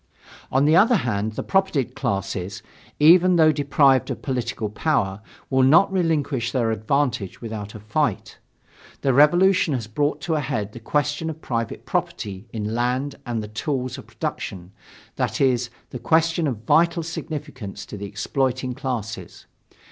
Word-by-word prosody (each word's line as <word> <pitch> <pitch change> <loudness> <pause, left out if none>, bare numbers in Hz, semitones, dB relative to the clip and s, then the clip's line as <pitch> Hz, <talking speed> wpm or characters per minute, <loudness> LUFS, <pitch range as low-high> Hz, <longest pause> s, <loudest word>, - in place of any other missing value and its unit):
On 135 +2 +3
the 155 +2 +5
other 225 +7 +6
hand, 110 - -1
the - - -4
propertied 190 -9 +1
classes, 95 +1 -3 0.4
even 175 +4 +6
though 160 -2 +6
deprived 140 -2 +3
of - - -5
political 125 -5 -2
power, 105 -4 -1 0.3
will 130 0 +2
not 155 +10 +5
relinquish 150 -9 0
their 120 -4 +1
advantages 110 -1 -1
without 110 -3 -6
a - - -7
fight. 110 +2 -2 0.6
The 135 - +2
Revolution 175 +3 +4
has 120 -4 -3
brought 145 +8 -1
to 170 - -1
a 155 - +1
head 105 -7 -2
the 120 - -8
question 145 +6 -1
of 160 0 -6
private 115 -6 -3
property 100 +2 -3
in 110 -1 -3
land 125 +4 0
and 115 -2 -2
the - - -6
tools 130 +4 -3
of - - -12
production 90 -1 -5 0.5
that - - -1
is, 125 -3 +2 0.2
the 125 - -6
question 165 +2 +2
of 115 -6 -4
vital 170 +6 +3
significance 145 - -6
to - - -9
the 100 0 -6
exploiting 130 +3 -1
classes. 120 -5 -5
130 Hz, 155 wpm, -23 LUFS, 110-155 Hz, 0.6 s, other